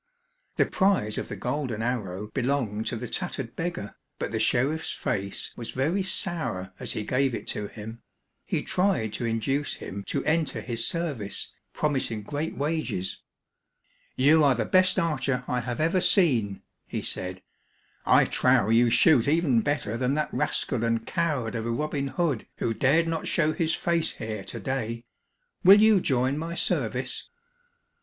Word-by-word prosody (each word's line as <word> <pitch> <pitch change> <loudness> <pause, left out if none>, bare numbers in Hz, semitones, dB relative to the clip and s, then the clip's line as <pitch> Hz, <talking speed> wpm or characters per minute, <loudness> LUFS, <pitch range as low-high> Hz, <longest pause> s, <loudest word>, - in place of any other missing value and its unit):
The - - +3
prize 190 - +1
of - - -5
the - - -5
golden 125 0 -3
arrow 105 -5 -2
belonged 120 -4 -1
to - - -1
the 120 +2 -5
tattered 135 -9 -4
beggar, 165 -12 -4 0.2
but - - -3
the 110 - -1
sheriff's 135 +8 +1
face 100 -8 -3
was 115 - -6
very 155 +10 0
sour 165 - -2
as - - -1
he 105 - -3
gave 130 +2 +1
it - - -6
to 105 - 0
him. 110 +2 -9 0.4
He - - -2
tried 180 - +1
to 120 - -3
induce 125 +6 -1
him 100 +1 -7
to - - -2
enter 160 +1 +1
his 115 -2 -1
service, 145 -12 -3 0.2
promising 130 -8 -1
great 150 +8 -4
wages. 145 - -2 0.9
"You 150 +4 +5
are 140 -3 +5
the - - -1
best 185 0 +4
archer 135 -6 0
I 125 - 0
have 120 +2 -4
ever 165 +4 +2
seen," 120 - +3 0.2
he - - -4
said. 90 0 -4 0.6
"I - - +5
trow 100 - +3
you 115 +1 +5
shoot 140 -1 +5
even 145 -6 +3
better 115 -5 -1
than 130 +3 0
that 155 0 -2
rascal 125 -4 0
and 115 -1 0
coward 140 -10 -1
of 115 -1 -3
a - - -1
Robin 140 +3 -1
Hood 145 -5 -1
who 115 - -1
dared 150 +8 +3
not 165 -1 -2
show 155 -1 +2
his 160 -1 0
face 170 -1 0
here 110 -3 -5
today. 115 -3 -4 0.6
Will 195 +2 +9
you 215 -2 +6
join 130 0 +1
my 165 +1 -4
service?" - - 0
130 Hz, 160 wpm, -26 LUFS, 115-160 Hz, 0.9 s, Will